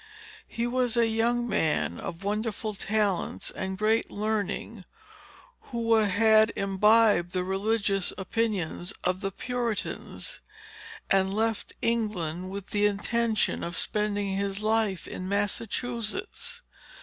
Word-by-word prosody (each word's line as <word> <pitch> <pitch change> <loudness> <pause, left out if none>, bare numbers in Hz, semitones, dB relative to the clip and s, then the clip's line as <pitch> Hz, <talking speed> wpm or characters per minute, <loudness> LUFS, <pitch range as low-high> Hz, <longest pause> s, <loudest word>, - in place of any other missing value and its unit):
He 235 - -2
was 245 -1 0
a 235 - +5
young 235 +2 +1
man 155 - +1
of 170 +2 -6
wonderful 215 +1 -2
talents 205 -1 -1
and 190 0 -4
great 220 +3 +2
learning, 215 0 -2 0.9
who 230 -2 +1
had 220 +1 +5
imbibed 200 -2 +4
the 180 -1 0
religious 195 0 0
opinions 195 -3 -1
of 180 +1 0
the 195 - -1
Puritans, 245 - -4 0.7
and 190 0 +4
left 220 +1 -1
England 185 -7 -1
with 200 0 -7
the 205 0 +4
intention 220 +2 0
of 170 0 -3
spending 205 -2 0
his 200 +1 -1
life 215 -4 +1
in 185 0 -5
Massachusetts. 230 - -2
210 Hz, 115 wpm, -28 LUFS, 195-225 Hz, 0.9 s, a